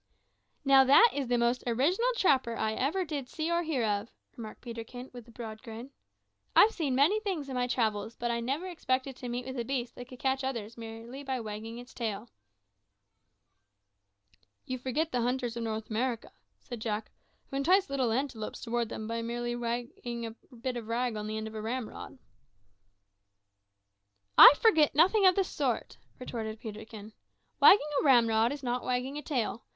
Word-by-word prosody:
"Now, 270 Hz, -1 st, +7 dB
that 370 Hz, -, +7 dB
is 280 Hz, -3 st, -2 dB
the 245 Hz, 0 st, +2 dB
most 240 Hz, +1 st, +1 dB
original 315 Hz, -, +2 dB
trapper 260 Hz, -, +2 dB
I 220 Hz, 0 st, 0 dB
ever 305 Hz, +11 st, 0 dB
did 285 Hz, -6 st, -5 dB
see 320 Hz, +1 st, -3 dB
or 340 Hz, 0 st, +2 dB
hear 305 Hz, -8 st, -1 dB
of," 205 Hz, +1 st, -1 dB, 0.3 s
remarked 220 Hz, -2 st, -9 dB
Peterkin, 245 Hz, +1 st, -8 dB
with 245 Hz, -2 st, -10 dB
a -, -, -14 dB
broad 220 Hz, -2 st, -8 dB
grin. 235 Hz, +2 st, -9 dB, 0.6 s
"I've 440 Hz, -, +7 dB
seen 295 Hz, -, -1 dB
many 310 Hz, +11 st, +4 dB
things 370 Hz, -10 st, -3 dB
in -, -, -5 dB
my 250 Hz, -1 st, 0 dB
travels, 220 Hz, -3 st, -1 dB
but 240 Hz, 0 st, -2 dB
I 235 Hz, -, -1 dB
never 275 Hz, +9 st, -2 dB
expected 270 Hz, -6 st, -2 dB
to 250 Hz, -, -6 dB
meet 245 Hz, +1 st, -3 dB
with 260 Hz, -1 st, -5 dB
a -, -, -1 dB
beast 245 Hz, -1 st, -3 dB
that 245 Hz, -, -9 dB
could 255 Hz, -, -11 dB
catch 265 Hz, +1 st, 0 dB
others 235 Hz, -5 st, -4 dB
by 235 Hz, -, -15 dB
merely 230 Hz, +4 st, -8 dB
wagging 225 Hz, -4 st, -5 dB
its 245 Hz, +1 st, -11 dB
tail." 225 Hz, -1 st, -4 dB, 2.3 s
"You 255 Hz, 0 st, -4 dB
forget 275 Hz, +6 st, -1 dB
the 245 Hz, -, 0 dB
hunters 245 Hz, -1 st, -1 dB
of 235 Hz, -, -4 dB
North 220 Hz, -1 st, -4 dB
America," 235 Hz, +1 st, -2 dB, 0.3 s
said 240 Hz, -3 st, -8 dB
Jack, 215 Hz, -1 st, -3 dB, 0.4 s
"who 275 Hz, -, -2 dB
entice 370 Hz, +8 st, +3 dB
little 265 Hz, -4 st, 0 dB
antelopes 235 Hz, -3 st, -3 dB
towards 235 Hz, -1 st, -1 dB
them 220 Hz, -, -5 dB
by 230 Hz, 0 st, -2 dB
merely 240 Hz, +1 st, -3 dB
wagging 235 Hz, 0 st, -4 dB
a 225 Hz, -, -5 dB, 0.2 s
bit 245 Hz, +1 st, -3 dB
of 230 Hz, -2 st, -7 dB
rag 240 Hz, 0 st, -1 dB
on 210 Hz, 0 st, -4 dB
the 215 Hz, 0 st, -3 dB
end 220 Hz, -, -4 dB
of 220 Hz, -, -7 dB
a 215 Hz, -, -5 dB
ramrod." 235 Hz, +3 st, -5 dB, 2.2 s
"I -, -, +11 dB
forget 320 Hz, -12 st, +4 dB
nothing 380 Hz, +6 st, +5 dB
of 370 Hz, -, +5 dB
the 390 Hz, -, +3 dB
sort," 275 Hz, -10 st, -2 dB, 0.2 s
retorted 220 Hz, -3 st, -5 dB
Peterkin. 215 Hz, -1 st, -9 dB, 0.5 s
"Wagging -, -, +9 dB, 0.2 s
a -, -, -1 dB
ramrod 230 Hz, -4 st, +4 dB
is 285 Hz, -1 st, -6 dB
not 245 Hz, 0 st, -1 dB
wagging 255 Hz, +3 st, -2 dB
a -, -, -7 dB
tail. 245 Hz, -6 st, -2 dB
245 Hz, 180 wpm, -30 LUFS, 230-275 Hz, 2.3 s, I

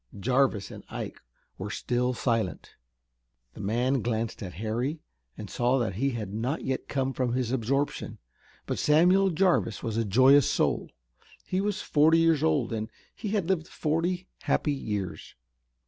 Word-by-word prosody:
Jarvis 125 Hz, -2 st, +1 dB
and -, -, -10 dB
Ike -, -, -6 dB, 0.4 s
were 95 Hz, +2 st, -4 dB
still 125 Hz, +3 st, -1 dB
silent. 115 Hz, -6 st, -1 dB, 0.8 s
The -, -, -12 dB
man 120 Hz, +6 st, +1 dB
glanced 115 Hz, -1 st, -2 dB
at 90 Hz, -3 st, -6 dB
Harry 120 Hz, -, -2 dB, 0.4 s
and -, -, -6 dB
saw 125 Hz, +2 st, +1 dB
that 115 Hz, -6 st, -1 dB
he 135 Hz, +9 st, 0 dB
had 110 Hz, -6 st, -5 dB
not 125 Hz, +8 st, -2 dB
yet 130 Hz, 0 st, -2 dB
come 135 Hz, -1 st, -1 dB
from 125 Hz, -2 st, -1 dB
his 125 Hz, -2 st, -1 dB
absorption, 135 Hz, +3 st, -1 dB, 0.5 s
but -, -, -3 dB
Samuel 180 Hz, +6 st, +4 dB
Jarvis 170 Hz, -, +1 dB
was 115 Hz, -1 st, -2 dB
a 115 Hz, -, +2 dB
joyous 130 Hz, +7 st, +5 dB
soul. -, -, 0 dB, 0.6 s
He 185 Hz, +1 st, -1 dB
was 205 Hz, 0 st, -2 dB
forty 155 Hz, +2 st, +4 dB
years 165 Hz, -3 st, +3 dB
old, 145 Hz, -7 st, +1 dB
and 110 Hz, -1 st, -3 dB, 0.2 s
he 220 Hz, -, -6 dB
had 200 Hz, -5 st, 0 dB
lived 180 Hz, -3 st, 0 dB
forty 175 Hz, +4 st, -1 dB
happy 150 Hz, -, +1 dB
years. 105 Hz, -9 st, -4 dB
130 Hz, 155 wpm, -28 LUFS, 115-160 Hz, 0.8 s, joyous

